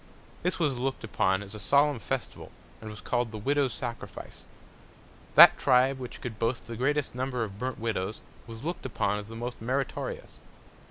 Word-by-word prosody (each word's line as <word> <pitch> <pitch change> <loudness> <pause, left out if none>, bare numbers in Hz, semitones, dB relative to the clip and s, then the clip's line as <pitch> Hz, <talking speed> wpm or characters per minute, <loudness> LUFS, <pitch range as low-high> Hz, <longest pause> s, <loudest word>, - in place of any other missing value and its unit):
This 180 - 0
was 145 -7 0
look'd 130 0 -2
upon 95 -2 +1
as 100 - -10
a 105 - -7
solemn 140 +5 +3
Festival, 130 +1 -4 0.3
and 110 - -7
was 105 -1 -9
call'd 120 -1 0
the 110 - -6
Widow's 140 +4 +1
Sacrifice. 120 +2 -7 0.9
That - - +10
Tribe 130 +1 +4
which 125 -2 -8
could 115 -3 -6
boast 115 +1 0
of - - -21
the 115 - -4
greatest 145 +4 0
Number 125 -1 -2
of 100 -2 -7
burnt 130 +1 -3
Widows, 110 -3 -2 0.3
was 115 +3 -9
look'd 170 -5 -3
upon 105 -3 0
as 105 - -8
the 115 - -9
most 120 +1 -5
meritorious. 130 +4 -3
120 Hz, 180 wpm, -28 LUFS, 110-135 Hz, 0.9 s, That